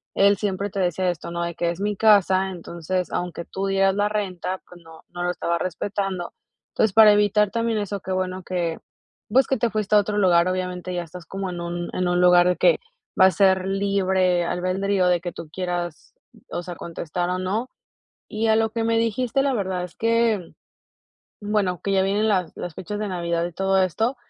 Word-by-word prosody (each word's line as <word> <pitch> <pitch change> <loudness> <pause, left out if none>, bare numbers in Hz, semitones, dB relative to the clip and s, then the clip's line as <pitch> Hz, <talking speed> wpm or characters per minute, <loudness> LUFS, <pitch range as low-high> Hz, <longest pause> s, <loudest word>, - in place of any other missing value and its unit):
él 200 0 +4
siempre 200 0 -2
te 200 - -5
decía 180 0 +1
esto, 170 0 -5
¿no?, 170 0 -3
de 170 -1 -4
que, 170 0 0
es 170 - -8
mi 205 0 0
casa, 190 -3 +4
entonces 175 +1 -4
aunque 175 -1 -4
tú 195 - -4
dieras 195 0 +2
la 205 0 +1
renta, 190 -3 -3
pues, 175 -1 -15
no 165 0 -14
no 175 0 -5
lo 180 - +1
estaba 170 -1 -1
respetando, 185 +1 -3 0.4
entonces, 220 -3 +2
para 215 -1 +9
evitar 210 0 +3
también 230 -1 0
eso, 205 -1 -3
qué 190 - -7
bueno 185 0 -2
que, 175 -3 -2 0.5
pues 260 +5 +4
que 265 - +1
te 235 0 +1
fuiste 215 -1 0
a - - +8
otro 205 +1 -1
lugar, 180 -3 +4
obviamente 185 0 -3
ya 175 -1 -2
estás 170 +1 -11
como 195 -1 -4
en 175 -1 -6
un 175 0 -4
en 180 0 0
un 175 0 +1
lugar 180 0 +6
de 180 - +2
que - - +4 0.4
va 190 - +8
a 190 - +6
ser 190 -1 +3
libre 190 -2 +1
albedrío 185 +2 0
de 175 -1 +2
que 175 - -4
tú 160 -2 -9
quieras, 175 -2 -4 0.4
o 175 - -3
sea, 175 0 -7
contestar 170 +1 -4
o 180 - -1
no, 210 +7 -2 0.6
y 220 +1 -1
a 220 - +4
lo 220 0 +1
que 225 0 -2
me 225 0 +2
dijiste 230 +3 0
la 275 -1 +1
verdad 185 -4 -2
es 180 - -11
que, 230 -5 +1 0.9
bueno, 205 -4 -1
que 200 - -2
ya 190 -1 +3
vienen 205 +3 +1
las 185 -5 0
las 175 - -6
fechas 205 +3 -5
de 210 - -2
navidad 170 -2 -1
y 175 - -7
todo 195 +2 +2
esto, 220 - 0
190 Hz, 210 wpm, -23 LUFS, 175-205 Hz, 0.9 s, para